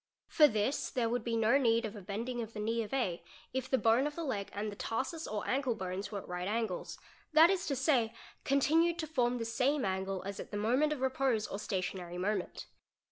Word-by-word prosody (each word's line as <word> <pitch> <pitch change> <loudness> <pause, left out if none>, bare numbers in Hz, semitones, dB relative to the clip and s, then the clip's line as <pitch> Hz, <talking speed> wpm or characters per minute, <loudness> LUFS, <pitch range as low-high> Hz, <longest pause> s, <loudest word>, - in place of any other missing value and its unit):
For 305 -3 +6
this 215 +3 0
there 245 -3 0
would 245 +2 -1
be 230 -1 -1
no 225 +5 +4
need 230 -3 +3
of 215 0 -5
a 205 - -8
bending 230 +6 -3
of 225 0 -7
the 210 - -6
knee 225 +2 0
of 215 - -6
A, 240 -11 -1 0.3
if 260 0 -2
the 265 - +3
bone 240 +4 +3
of 295 - -6
the 335 - -3
leg 210 -9 -2
and 210 +1 -3
the - - -8
tarsus 275 - -3
or 210 -1 -3
ankle 260 -3 +1
bones 190 +1 -4
were 205 - -3
at 195 - -7
right 180 +1 -3
angles, 215 -3 -2 0.4
that 320 +3 +8
is 385 -1 -1
to 280 - 0
say 255 -4 +2 0.3
continued 320 +5 +3
to 330 - -2
form 250 -5 +1
the 230 - -2
same_ 260 +4 +1
angle 190 0 -2
as 200 +1 -5
at - - -7
the 205 - -4
moment 250 +9 +2
of 295 -4 -3
repose 260 -4 +1
or 200 - -5
stationary 185 -3 -3
moment. 190 0 -2
230 Hz, 230 wpm, -33 LUFS, 205-270 Hz, 0.4 s, that